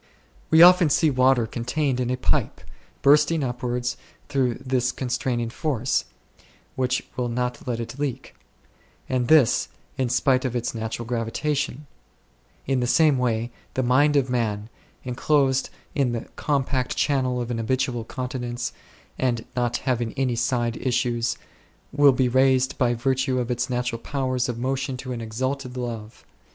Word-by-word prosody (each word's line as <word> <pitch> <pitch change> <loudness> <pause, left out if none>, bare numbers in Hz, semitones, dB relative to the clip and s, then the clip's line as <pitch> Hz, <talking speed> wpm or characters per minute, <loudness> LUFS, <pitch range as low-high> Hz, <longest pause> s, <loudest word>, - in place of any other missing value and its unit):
We 160 +1 +8
often 180 -2 +7
see 155 +2 +3
water 130 -2 +3
contained 125 +4 -1
in 125 -1 -1
a 125 - 0
pipe 125 - 0 0.4
bursting 150 +2 +4
upwards 125 0 -2 0.3
through 130 -4 +1
this 125 -1 0
con 130 - -5
straining 120 -2 -1
force, 130 -2 -1 0.7
which 130 0 0
will 125 -1 -1
not 125 +1 -3
let 120 -2 -1
it 120 +4 -6
leak; 140 -4 -3 0.7
and 125 -2 0
this, 150 -6 +4 0.3
in 130 -2 +1
spite 130 +1 +2
of 125 -2 -2
its 120 -1 -2
natural 115 +1 -4
gravitation: 125 +5 -2 0.8
in 135 -1 +1
the 125 - 0
same 150 0 +4
way, 120 -1 0 0.2
the 130 - +1
mind 145 +4 +3
of 135 -2 +3
man, 110 -4 -1 0.3
enclosed 135 +1 +1 0.2
in 135 -4 +1
the 115 - -2
compact 135 -3 -1
channel 130 -3 +1
of 120 0 -3
an 115 - -2
habitual 125 0 -1
continence, 125 0 -4 0.5
and 120 -3 0
not 120 -1 0
having 120 -4 -1
any 130 -3 0
side 120 -1 0
issues, 120 -2 0 0.5
will 145 0 +6
be 130 -1 +2
raised 130 +1 +3
by 120 -1 +2
virtue 130 +2 0
of 125 -1 -1
its 120 +2 -1
natural 125 -2 -2
powers 130 -3 -1
of 120 - -3
motion 130 +1 -2
to 130 0 -7
an 120 - -5
exalted 130 +3 -3
love. 115 -3 -6
125 Hz, 150 wpm, -24 LUFS, 120-135 Hz, 0.8 s, We